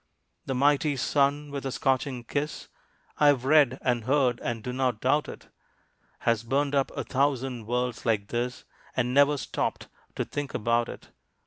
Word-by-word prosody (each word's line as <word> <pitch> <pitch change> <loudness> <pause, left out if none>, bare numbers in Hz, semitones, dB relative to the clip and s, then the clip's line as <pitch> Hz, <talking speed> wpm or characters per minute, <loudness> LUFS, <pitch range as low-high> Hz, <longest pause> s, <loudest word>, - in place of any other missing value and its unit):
The 135 - -1
mighty 145 +2 +2
sun, 145 +2 +1
with 140 -1 -4
a 135 - -3
scorching 130 -1 0
kiss 145 +5 -4 0.5
(I 150 - +5
have 135 -3 +3
read, 140 -3 +5
and 120 -3 0
heard, 130 -3 +2
and 115 -2 -4
do 125 - -4
not 125 -4 0
doubt 145 +5 +1
it) - - -11 0.7
Has 115 -2 +2
burned 140 +4 0
up 135 -1 +2
a - - -1
thousand 130 -4 -1
worlds 125 0 -1
like 105 -3 0
this, 120 +1 -3 0.3
And 125 0 +1
never 145 +1 +5
stopped - - -3 0.3
to - - -1
think 145 -1 -5
about 115 +1 +1
it. - - -10
130 Hz, 165 wpm, -27 LUFS, 120-140 Hz, 0.7 s, I